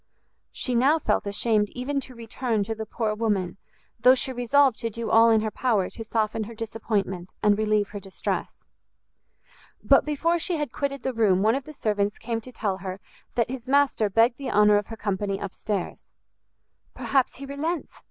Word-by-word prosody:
She 255 Hz, -, -2 dB
now 265 Hz, +6 st, +4 dB
felt 290 Hz, -, 0 dB
ashamed 210 Hz, 0 st, +1 dB
even 275 Hz, +3 st, -2 dB
to 260 Hz, -2 st, -10 dB
return 230 Hz, -1 st, -2 dB
to 225 Hz, +3 st, -3 dB
the 220 Hz, 0 st, -6 dB
poor 220 Hz, -1 st, -1 dB
woman, 205 Hz, -5 st, -1 dB, 0.4 s
though 250 Hz, +3 st, +7 dB
she 260 Hz, 0 st, -2 dB
resolved 255 Hz, +1 st, +3 dB
to 230 Hz, -, -2 dB
do 230 Hz, +1 st, -4 dB
all 230 Hz, +1 st, +7 dB
in 220 Hz, -1 st, +4 dB
her 215 Hz, 0 st, -2 dB
power 215 Hz, -8 st, 0 dB
to 225 Hz, -, -7 dB
soften 220 Hz, 0 st, -1 dB
her 230 Hz, +2 st, -10 dB
disappointment 210 Hz, -5 st, -3 dB
and 210 Hz, -1 st, +5 dB
relieve 215 Hz, -1 st, +1 dB
her 205 Hz, -, -6 dB
distress. 195 Hz, -1 st, -4 dB, 1.3 s
But -, -, +5 dB
before 330 Hz, +3 st, 0 dB
she 345 Hz, 0 st, -1 dB
had 295 Hz, -5 st, -3 dB
quitted 275 Hz, -2 st, -3 dB
the 260 Hz, -, -1 dB
room 200 Hz, -5 st, +3 dB
one 220 Hz, +1 st, +4 dB
of 270 Hz, +1 st, -3 dB
the 305 Hz, -, -9 dB
servants 205 Hz, -5 st, -1 dB
came 230 Hz, -1 st, -3 dB
to 255 Hz, -, -12 dB
tell 205 Hz, -5 st, -2 dB
her 190 Hz, 0 st, -6 dB, 0.4 s
that 235 Hz, 0 st, +1 dB
his 260 Hz, -2 st, -7 dB
master 275 Hz, -6 st, +3 dB
begged 230 Hz, +5 st, +3 dB
the 275 Hz, -, -4 dB
honor 210 Hz, 0 st, +5 dB
of 205 Hz, -, -2 dB
her 225 Hz, -, -8 dB
company 200 Hz, -1 st, -2 dB
up 200 Hz, -2 st, -5 dB
stairs. 205 Hz, -4 st, -4 dB, 0.9 s
"Perhaps 265 Hz, -2 st, +1 dB
he 275 Hz, -, -8 dB
relents!" 300 Hz, +4 st, -4 dB
225 Hz, 190 wpm, -25 LUFS, 210-255 Hz, 1.3 s, though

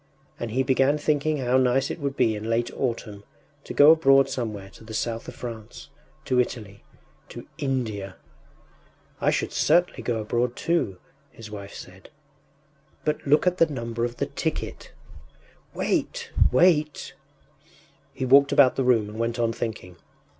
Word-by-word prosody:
And 120 Hz, -, -4 dB
he 130 Hz, +4 st, 0 dB
began 135 Hz, +3 st, +2 dB
thinking 150 Hz, 0 st, 0 dB
how 130 Hz, -1 st, +1 dB
nice 130 Hz, +1 st, +2 dB
it -, -, -6 dB
would 140 Hz, -2 st, -3 dB
be 110 Hz, -, +2 dB
in 105 Hz, +2 st, -5 dB
late 115 Hz, +1 st, 0 dB
autumn 115 Hz, -5 st, -3 dB, 0.4 s
to -, -, -8 dB
go 145 Hz, +2 st, +7 dB
abroad 135 Hz, -4 st, +5 dB
somewhere 105 Hz, -7 st, -5 dB
to -, -, -16 dB
the 110 Hz, 0 st, -8 dB
South 115 Hz, +1 st, -3 dB
of -, -, -8 dB
France... 115 Hz, -3 st, -9 dB, 0.3 s
to 125 Hz, -, +1 dB
Italy.... 105 Hz, -5 st, -6 dB, 0.5 s
to -, -, -9 dB
India! 110 Hz, -8 st, -3 dB, 1.0 s
“I -, -, +2 dB
should -, -, -1 dB
certainly 175 Hz, -7 st, +2 dB
go 115 Hz, -1 st, -2 dB
abroad 120 Hz, +3 st, -1 dB
too,” 165 Hz, -, -1 dB, 0.3 s
his 110 Hz, -2 st, -12 dB
wife 100 Hz, -1 st, -8 dB
said. 95 Hz, +1 st, -12 dB, 1.0 s
“But 150 Hz, -1 st, -2 dB
look 150 Hz, +5 st, +4 dB
at 180 Hz, 0 st, +1 dB
the 165 Hz, -, +5 dB
number 115 Hz, -5 st, -4 dB
of 120 Hz, 0 st, -3 dB
the -, -, 0 dB
ticket!” -, -, -4 dB, 0.8 s
“Wait, -, -, -2 dB, 0.2 s
wait!...” 155 Hz, 0 st, +2 dB, 1.0 s
He 130 Hz, -, -4 dB
walked 140 Hz, +2 st, +6 dB
about 130 Hz, -3 st, +5 dB
the 135 Hz, -, +1 dB
room 120 Hz, -4 st, +3 dB
and 105 Hz, +2 st, -9 dB
went 115 Hz, +1 st, -1 dB
on 115 Hz, -1 st, 0 dB
thinking. 100 Hz, -7 st, -6 dB
120 Hz, 155 wpm, -25 LUFS, 110-135 Hz, 1.0 s, go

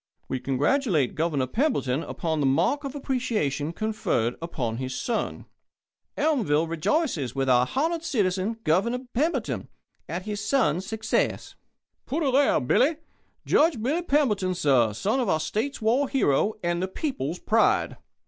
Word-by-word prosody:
"We 130 Hz, -, -2 dB
congratulate 145 Hz, -, +1 dB
Governor 155 Hz, -5 st, 0 dB
Pemberton 140 Hz, -, 0 dB
upon 160 Hz, -2 st, -3 dB
the 140 Hz, -, +2 dB
mark 260 Hz, -, +2 dB
of 275 Hz, 0 st, -5 dB
appreciation 220 Hz, -, -1 dB
conferred 170 Hz, -, -1 dB
upon 125 Hz, -9 st, -3 dB
his 130 Hz, +1 st, -4 dB
son" 235 Hz, -2 st, -2 dB, 0.7 s
"Elmville 210 Hz, -, +2 dB
rejoices 165 Hz, -, -1 dB
with 135 Hz, 0 st, 0 dB
our 125 Hz, -1 st, +4 dB
honoured 325 Hz, +3 st, 0 dB
citizen, 205 Hz, -, 0 dB
Governor 235 Hz, +11 st, +1 dB
Pemberton, 310 Hz, +7 st, -1 dB, 0.4 s
at 175 Hz, +2 st, -3 dB
his 205 Hz, 0 st, -4 dB
son's 195 Hz, -, +1 dB
success" 220 Hz, 0 st, -1 dB, 0.5 s
"Put 320 Hz, +4 st, -1 dB
her 275 Hz, -, +2 dB
there, 275 Hz, +2 st, +4 dB
Billy!" 275 Hz, -, +2 dB, 0.5 s
"Judge 315 Hz, -5 st, +3 dB
Billy 280 Hz, +10 st, 0 dB
Pemberton, 220 Hz, -, +1 dB
sir; 130 Hz, -9 st, +3 dB
son 210 Hz, -, 0 dB
of 240 Hz, -6 st, 0 dB
our 160 Hz, -, +2 dB
State's 220 Hz, -, -3 dB
war 255 Hz, +6 st, +2 dB
hero 215 Hz, -, +2 dB
and 175 Hz, 0 st, 0 dB
the 185 Hz, -, 0 dB
people's 185 Hz, -, -3 dB
pride!" 225 Hz, +4 st, +2 dB
205 Hz, 140 wpm, -26 LUFS, -, 0.7 s, our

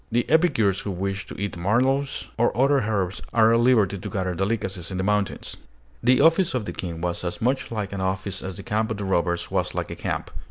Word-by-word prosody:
The 120 Hz, +1 st, +1 dB
epicures 115 Hz, -, +3 dB
who -, -, -5 dB
wish 95 Hz, +2 st, -3 dB
to -, -, -8 dB
eat 100 Hz, 0 st, -3 dB
mallows 130 Hz, +10 st, +1 dB
or 120 Hz, +1 st, +1 dB
other 140 Hz, +2 st, +4 dB
herbs 100 Hz, -2 st, -1 dB
are 115 Hz, 0 st, +5 dB
at 115 Hz, -, +4 dB
liberty 110 Hz, -6 st, +3 dB
to -, -, -6 dB
gather 95 Hz, -3 st, -2 dB
delicacies 95 Hz, -2 st, -2 dB
in 95 Hz, -, -4 dB
the 95 Hz, -, -1 dB
mountains. 105 Hz, 0 st, -1 dB, 0.4 s
The 125 Hz, +2 st, +4 dB
office 165 Hz, +1 st, +4 dB
of 120 Hz, -4 st, -1 dB
the -, -, -5 dB
King 85 Hz, -3 st, -5 dB
was 90 Hz, 0 st, -2 dB
as 85 Hz, -, -3 dB
much 130 Hz, +4 st, 0 dB
like 105 Hz, -3 st, -3 dB
an 95 Hz, -, -3 dB
office 95 Hz, 0 st, -2 dB
as 95 Hz, -2 st, -6 dB
the -, -, -7 dB
camp 110 Hz, +1 st, 0 dB
of 110 Hz, -, -3 dB
the 100 Hz, -, -4 dB
robbers 85 Hz, -2 st, 0 dB
was -, -, -1 dB
like -, -, -3 dB
a -, -, -4 dB
camp. -, -, -3 dB
100 Hz, 230 wpm, -24 LUFS, 95-120 Hz, 0.4 s, are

